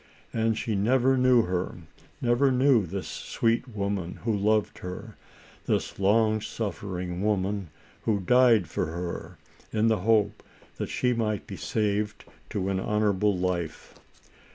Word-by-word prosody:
And 110 Hz, -1 st, +1 dB
she 110 Hz, -, -2 dB
never 125 Hz, +6 st, +3 dB
knew 125 Hz, -2 st, +5 dB
her; 90 Hz, -1 st, -2 dB, 0.4 s
never 125 Hz, +3 st, +3 dB
knew 125 Hz, -6 st, +4 dB
this 95 Hz, +3 st, -4 dB
sweet 115 Hz, +3 st, -1 dB
woman 100 Hz, -5 st, -3 dB
who 115 Hz, -2 st, +1 dB
loved 105 Hz, +1 st, +1 dB
her, 90 Hz, 0 st, -7 dB, 0.5 s
this -, -, -1 dB
long 110 Hz, +2 st, +3 dB
suffering 95 Hz, -5 st, -4 dB
woman, 100 Hz, -3 st, 0 dB, 0.4 s
who 105 Hz, -3 st, +2 dB
died 115 Hz, -1 st, +4 dB
for -, -, -2 dB
her, 85 Hz, +2 st, -5 dB, 0.3 s
in 110 Hz, +1 st, +2 dB
the 110 Hz, -3 st, +2 dB
hope 110 Hz, +1 st, +2 dB, 0.4 s
that -, -, -3 dB
she 125 Hz, -1 st, +1 dB
might 110 Hz, -4 st, -1 dB
be -, -, -7 dB
saved 105 Hz, -1 st, -1 dB, 0.2 s
to 95 Hz, -1 st, -2 dB
an 95 Hz, -1 st, 0 dB
honorable 105 Hz, -1 st, +1 dB
life. 90 Hz, -3 st, -3 dB
105 Hz, 135 wpm, -27 LUFS, 95-115 Hz, 0.5 s, knew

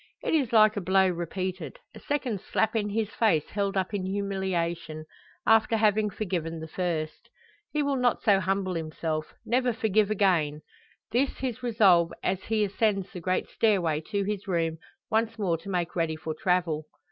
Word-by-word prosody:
It -, -, -1 dB
is 275 Hz, -7 st, +2 dB
like 215 Hz, -2 st, +6 dB
a 205 Hz, -, -2 dB
blow 190 Hz, +1 st, +3 dB
repeated 185 Hz, -, -4 dB, 0.2 s
a -, -, -11 dB
second 255 Hz, -9 st, -2 dB
slap 220 Hz, -, 0 dB
in 210 Hz, -2 st, 0 dB
his 215 Hz, 0 st, -1 dB
face 165 Hz, -10 st, +2 dB
held 200 Hz, -1 st, -1 dB
up 190 Hz, +2 st, -1 dB
in 200 Hz, -2 st, -1 dB
humiliation 185 Hz, -5 st, -2 dB, 0.4 s
after 225 Hz, 0 st, +4 dB
having 215 Hz, -1 st, +3 dB
forgiven 170 Hz, -5 st, -3 dB
the 160 Hz, -, -7 dB
first. 160 Hz, -2 st, -3 dB, 0.4 s
He 300 Hz, -1 st, 0 dB
will 280 Hz, -1 st, 0 dB
not 250 Hz, -2 st, +1 dB
so 205 Hz, -4 st, +5 dB
humble 190 Hz, 0 st, -1 dB
himself 155 Hz, -1 st, -3 dB
never 250 Hz, +2 st, +2 dB
forgive 215 Hz, -2 st, +1 dB
again. 170 Hz, -8 st, +1 dB, 0.5 s
This 260 Hz, +4 st, +1 dB
his 255 Hz, -2 st, -3 dB
resolve 200 Hz, -8 st, +4 dB
as 190 Hz, 0 st, -1 dB
he 220 Hz, -1 st, +1 dB
ascends 200 Hz, -1 st, 0 dB
the 180 Hz, -, -6 dB
great 185 Hz, +2 st, -1 dB
stairway 175 Hz, -9 st, +1 dB
to 200 Hz, -2 st, 0 dB
his 205 Hz, 0 st, -3 dB
room, 165 Hz, -3 st, 0 dB, 0.3 s
once 225 Hz, +1 st, +1 dB
more 180 Hz, -6 st, 0 dB
to 200 Hz, -, -10 dB
make 175 Hz, -3 st, -2 dB
ready 165 Hz, -2 st, 0 dB
for 155 Hz, 0 st, -5 dB
travel. 165 Hz, -2 st, 0 dB
195 Hz, 170 wpm, -27 LUFS, 170-215 Hz, 0.5 s, like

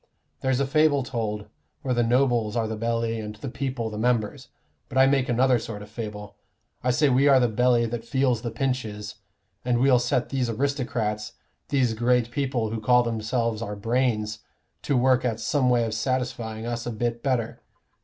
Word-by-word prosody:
There's 130 Hz, -1 st, +1 dB
a 140 Hz, -, +2 dB
fable 145 Hz, 0 st, +3 dB
told 110 Hz, -4 st, -3 dB, 0.4 s
where 130 Hz, -, 0 dB
the 120 Hz, -, +2 dB
nobles 120 Hz, -2 st, +2 dB
are 115 Hz, -2 st, 0 dB
the 110 Hz, -, -3 dB
belly 115 Hz, 0 st, -1 dB
and 105 Hz, -1 st, -6 dB
the 110 Hz, +6 st, -7 dB
people 125 Hz, -3 st, -3 dB
the 105 Hz, -, -5 dB
members. 115 Hz, -2 st, 0 dB, 0.4 s
But 130 Hz, -, -4 dB
I 130 Hz, -, +7 dB
make 135 Hz, -2 st, +2 dB
another 125 Hz, +1 st, +3 dB
sort 110 Hz, -2 st, -7 dB
of 105 Hz, -, -14 dB
fable. 105 Hz, -2 st, -7 dB, 0.5 s
I 125 Hz, -, +1 dB
say, 135 Hz, +4 st, +3 dB
we 135 Hz, +2 st, +4 dB
are 135 Hz, -2 st, +6 dB
the 125 Hz, -, +3 dB
belly 120 Hz, +1 st, +2 dB
that 115 Hz, 0 st, -4 dB
feels 125 Hz, -1 st, +1 dB
the 120 Hz, -, -3 dB
pinches, 115 Hz, -4 st, -3 dB, 0.5 s
and 125 Hz, -1 st, +1 dB
we'll 130 Hz, -1 st, +5 dB
set 120 Hz, 0 st, 0 dB
these 130 Hz, -3 st, -1 dB
aristocrats, 115 Hz, -4 st, -2 dB, 0.4 s
these 130 Hz, -5 st, +2 dB
great 120 Hz, +1 st, +1 dB
people 125 Hz, -5 st, -1 dB
who 110 Hz, -1 st, -3 dB
call 125 Hz, +2 st, +4 dB
themselves 115 Hz, 0 st, -1 dB
our 105 Hz, -2 st, -4 dB
brains, 110 Hz, -1 st, 0 dB, 0.4 s
to 140 Hz, -, 0 dB
work 130 Hz, 0 st, +3 dB
at 115 Hz, -3 st, -1 dB
some 125 Hz, +3 st, +1 dB
way 120 Hz, -1 st, +3 dB
of 110 Hz, -, -3 dB
satisfying 115 Hz, -2 st, -2 dB
us 120 Hz, 0 st, -3 dB
a -, -, -2 dB
bit 120 Hz, +1 st, -2 dB
better. 125 Hz, -4 st, -1 dB
120 Hz, 185 wpm, -25 LUFS, 110-130 Hz, 0.5 s, I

